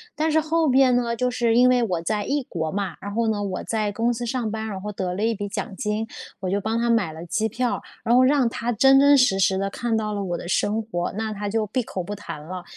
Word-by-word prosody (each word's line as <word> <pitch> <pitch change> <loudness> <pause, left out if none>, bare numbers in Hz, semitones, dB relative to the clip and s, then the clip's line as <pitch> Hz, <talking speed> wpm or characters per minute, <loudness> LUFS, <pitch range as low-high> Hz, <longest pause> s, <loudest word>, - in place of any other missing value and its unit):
但 310 +1 0
是 315 - +4
后 320 0 +1
边 260 -1 +5
呢， 240 -1 0
就 250 +1 0
是 240 -2 +1
因 250 +1 +6
为 250 -1 +4
我 180 -7 -1
在 210 +4 -1
异 280 +3 -1
国 160 -3 -3
嘛， 195 -4 -3
然 205 0 -6
后 230 +1 +1
呢， 210 -2 0
我 190 -2 -3
在 215 -2 -1
公 230 +3 0
司 240 +1 -4
上 240 -1 -2
班， 220 0 -4
然 200 -3 -5
后 210 +2 -4
得 185 -2 -3
了 200 +4 -3
一 230 +1 +2
笔 205 0 -4
奖 205 0 -4
金， 210 +2 -2 0.3
我 185 -1 -3
就 200 +2 0
帮 220 +3 -1
她 235 0 0
买 230 -8 +2
了 160 +2 -9
机 220 +6 -1
票， 245 +3 -1 0.2
然 235 +1 +3
后 255 - +6
让 265 -1 +4
她 230 +2 -3
真 270 +4 +5
真 285 +1 +6
实 250 -7 +4
实 190 0 +3
地 195 +1 -1
看 235 +3 -2
到 215 -1 -2
了 200 -1 -2
我 175 -2 -2
的 - - -8
生 210 +4 +1
活， 175 -6 -3
那 220 0 -2
她 205 0 -4
就 220 +1 0
闭 245 +5 -1
口 190 - -5
不 205 +4 -5
谈 165 -7 -8
了， 180 +4 -7
220 Hz, 295 characters per minute, -23 LUFS, 195-245 Hz, 0.3 s, 因